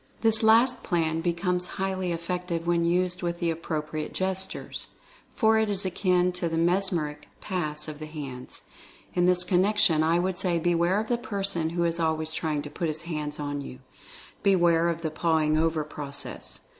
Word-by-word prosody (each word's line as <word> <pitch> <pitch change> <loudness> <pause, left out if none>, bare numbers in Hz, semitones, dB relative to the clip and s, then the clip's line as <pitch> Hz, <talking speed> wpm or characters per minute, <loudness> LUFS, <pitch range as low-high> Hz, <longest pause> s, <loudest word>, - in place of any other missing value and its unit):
This 225 -1 +5
last 230 +3 +5
plan 165 -3 0
becomes 180 +1 0
highly 190 -1 -1
effective 170 0 -3
when 170 -1 +2
used 180 +1 +1
with 170 -1 -2
the 170 -1 +1
appropriate 155 -1 -4
gestures, 190 0 -3 0.5
for 220 -1 +4
it 220 -1 +1
is 200 -1 +1
akin 180 -1 +2
to 180 -1 -2
the 165 - -2
mesmeric 165 -4 0
"pass" 155 -5 -2
of 150 -1 -7
the 155 - -6
hands. 140 -5 -8 0.5
In 175 0 +2
this 180 0 +4
connection 180 -2 +3
I 165 +2 +3
would 180 +1 -1
say 180 -3 +1
beware 175 +3 +2
of 220 - -2
the 235 +1 -1
person 195 -9 -2
who 170 +1 -1
is 170 0 0
always 160 -1 0
trying 155 -3 -1
to 145 - -7
put 165 +2 -2
his 155 +1 -3
hands 150 -3 -4
on 145 -1 -3
you 130 - -8 0.4
— - - -20
beware 170 -4 +4
of 165 -1 -3
the 160 - -1
"pawing 155 -1 +1
over" 160 0 +1
process. 145 -1 -6
170 Hz, 180 wpm, -27 LUFS, 160-185 Hz, 0.5 s, This